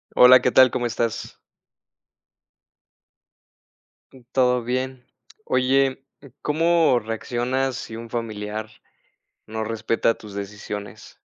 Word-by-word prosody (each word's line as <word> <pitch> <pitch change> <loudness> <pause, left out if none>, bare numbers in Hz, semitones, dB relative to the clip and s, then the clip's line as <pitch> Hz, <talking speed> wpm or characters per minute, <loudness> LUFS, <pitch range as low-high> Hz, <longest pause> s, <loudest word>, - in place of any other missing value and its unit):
Hola, 125 0 +8
¿qué 125 - +2
tal? 130 -1 +7
¿Cómo 120 - -2
estás? 115 0 -3 3.0
Todo 125 -2 +3
bien. 130 +1 -3 0.4
Oye, 135 +1 +1 0.4
¿cómo 165 -2 +3
reaccionas 125 +4 -2
si 110 - -7
un 115 0 -9
familiar 110 -2 -4 0.8
no 110 0 -4
respeta 115 +1 0
tus 105 -2 -12
decisiones? 100 0 -8
120 Hz, 90 wpm, -23 LUFS, 110-130 Hz, 3.0 s, Hola